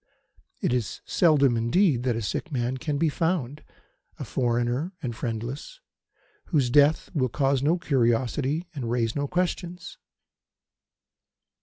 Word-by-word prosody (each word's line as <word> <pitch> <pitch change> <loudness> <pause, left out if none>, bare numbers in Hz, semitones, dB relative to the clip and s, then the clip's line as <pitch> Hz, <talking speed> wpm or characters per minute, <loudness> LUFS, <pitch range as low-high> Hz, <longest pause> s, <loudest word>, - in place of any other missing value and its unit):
It - - +1
is 125 -4 -2
seldom, 145 -7 +4
indeed, 125 - +2
that 125 -3 +1
a 115 - -3
sick 165 - -3
man 125 -1 -1
can 145 +2 -2
be 165 +3 +2
found 155 -3 -1 0.5
a - - -6
foreigner 120 +7 -1
and 120 -3 -3
friendless 120 - -5 0.7
whose 135 -7 +1
death 145 +3 +4
will 130 -6 +1
cause 135 +1 +1
no 155 +5 +2
curiosity 135 +3 0
and 130 -6 -4
raise 115 -2 0
no 145 0 -1
questions. 180 +1 -3
135 Hz, 130 wpm, -26 LUFS, 120-160 Hz, 0.7 s, seldom